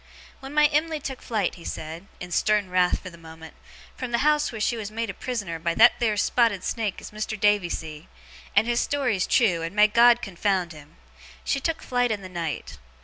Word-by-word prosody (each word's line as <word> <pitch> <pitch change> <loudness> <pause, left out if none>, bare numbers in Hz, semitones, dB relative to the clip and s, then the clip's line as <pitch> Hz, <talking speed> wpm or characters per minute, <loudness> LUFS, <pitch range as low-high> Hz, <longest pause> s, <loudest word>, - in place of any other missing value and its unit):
'When 270 +2 -9
my 300 0 +6
Em'ly 305 +1 +1
took 265 -2 -6
flight,' 215 -6 -1
he - - -11
said, 160 +5 -7
in 180 0 -8
stern 205 +1 +1
wrath 180 -1 +3
for 185 - -8
the 170 - -15
moment, 160 -1 -12 0.4
'from 255 - -5
the 235 +4 0
house 300 0 +2
wheer 225 - -7
she 225 +3 +1
was 215 -3 -5
made 225 0 -3
a - - -11
prisoner 200 -8 -4
by 170 0 -1
that 240 +2 +6
theer 220 -3 +1
spotted 205 -3 +2
snake 215 -4 -2
as - - -11
Mas'r 215 0 -4
Davy 205 -3 +3
see, 155 0 -6 0.5
and 205 - +5
his 240 0 +1
story's 250 -10 0
trew, 185 -9 +3
and 165 +4 -5
may 210 0 +7
GOD 235 +2 +5
confound 190 -2 -1
him! 150 +1 -15 0.5
she 275 - 0
took 325 +3 -2
flight 245 -1 0
in 210 -3 -3
the 185 - -8
night. 165 - -5
210 Hz, 210 wpm, -25 LUFS, 175-240 Hz, 0.5 s, may